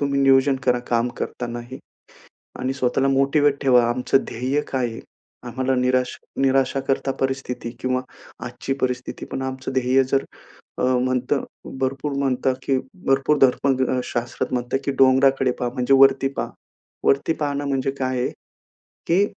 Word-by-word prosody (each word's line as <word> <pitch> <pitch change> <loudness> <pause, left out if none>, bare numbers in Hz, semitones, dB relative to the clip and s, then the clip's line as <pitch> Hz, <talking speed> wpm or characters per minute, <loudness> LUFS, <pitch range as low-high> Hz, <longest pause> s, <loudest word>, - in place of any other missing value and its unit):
तुम्ही 140 -1 0
नियोजन 135 0 +4
करा 125 -1 +3
काम 120 0 +1
करतांनाही 120 +1 -5 0.8
आणि 130 +1 -1
स्वतःला 130 +1 +1
मोटिव्हेट 140 +1 +2
ठेवा 125 -3 +5
आमचं 125 +2 +1
ध्येय 130 +5 -1
काय 130 -2 -1
आहे? 115 - -8 0.4
आम्हाला 130 +2 -1
निराश 125 0 +1 0.2
निराशाकरता 135 0 +1
परिस्थिती 135 -3 -2
किंवा 130 0 0 0.4
आजची 135 - -4
परिस्थिती 125 -1 -3
पण 135 - -3
आमचं 130 0 -4
ध्येय 130 +1 +3
जर 135 +1 0 0.5
अ, - - -2
म्हणतं 130 +2 +1 0.4
भरपूर 135 +2 -2
म्हणतं, 135 -1 0
की 135 0 +1 0.3
भरपूर 135 +2 +3
धर्मशास्त्रात 130 -2 +1
म्हणतात, 125 +1 -1
की 140 - -1
डोंगराकडे 135 0 +4
पहा 125 -1 -1
म्हणजे 125 0 +1
वरती 135 0 +5
पहा - - -2 0.6
वरती 140 +4 +3
पाहणं 145 -2 -2
म्हणजे 135 -1 0
काय 130 -1 -1
आहे? 125 - 0 0.8
की 185 +4 +3
130 Hz, 135 wpm, -22 LUFS, 125-135 Hz, 0.8 s, ठेवा